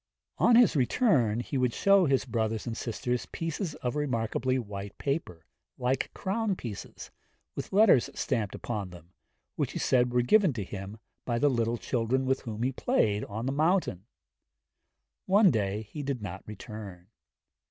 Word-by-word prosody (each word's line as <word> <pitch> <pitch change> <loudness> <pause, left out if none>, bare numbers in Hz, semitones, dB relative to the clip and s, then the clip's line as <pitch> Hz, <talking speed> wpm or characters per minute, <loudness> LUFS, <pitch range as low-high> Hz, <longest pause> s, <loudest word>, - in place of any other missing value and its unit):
On 240 - +5
his 235 -7 +6
return 125 - +2
he 135 +2 -3
would 125 -2 +1
show 195 -3 +4
his 135 -1 +2
brothers 110 -3 -1
and 115 -2 -3
sisters 120 +1 -3
pieces 165 0 -4
of 125 +2 -1
remarkably 130 -2 0
white 100 -4 -6
paper, 140 - -3 0.3
like 125 +1 -1
crown 205 +1 -1
pieces, 115 - -8 0.4
with - - -5
letters 195 - +5
stamped 110 -7 -1
upon 105 -5 -4
them, 85 0 -14 0.4
which - - -1
he - - -4
said 125 -1 +2
were 125 0 +2
given 190 - +4
to 110 -4 -3
him 100 +2 -7 0.3
by 120 -1 -1
the 145 +4 +3
little 120 -2 0
children 125 +3 0
with 130 0 +1
whom 110 0 -5
he 130 - +1
played 105 -4 +1
on 110 +4 -5
the 135 - 0
mountain. 155 - +1 1.2
One 195 -1 +6
day 105 -2 -1
he 110 +8 -7
did 140 -2 -2
not 95 -1 -6
return. 105 -4 -9
125 Hz, 160 wpm, -29 LUFS, 105-145 Hz, 1.2 s, his